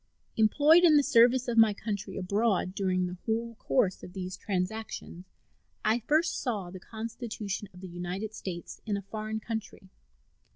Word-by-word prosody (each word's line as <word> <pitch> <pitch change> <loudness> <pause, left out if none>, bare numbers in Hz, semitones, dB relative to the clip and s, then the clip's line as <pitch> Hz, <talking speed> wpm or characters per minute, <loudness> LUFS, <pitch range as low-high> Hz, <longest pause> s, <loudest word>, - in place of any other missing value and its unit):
Employed 295 +10 +5
in 315 -4 +7
the 290 - +5
service 250 -1 +5
of 230 -1 +2
my 220 -2 +6
country 205 -2 -4
abroad 195 0 +1
during 185 -2 0
the 180 0 -5
whole 230 +1 -1
course 205 -8 +1
of 180 - -10
these 185 -1 -5
transactions, 190 -2 -4 0.6
I 220 +2 +3
first 305 +8 +1
saw 205 -8 -2
the 185 - -8
Constitution 220 -2 -5
of 180 - -14
the 190 - -7
United 180 +5 -5
States 175 -5 -7
in 205 -2 0
a 200 - -6
foreign 215 +2 -4
country. 220 -4 -6
215 Hz, 160 wpm, -29 LUFS, 185-230 Hz, 0.6 s, in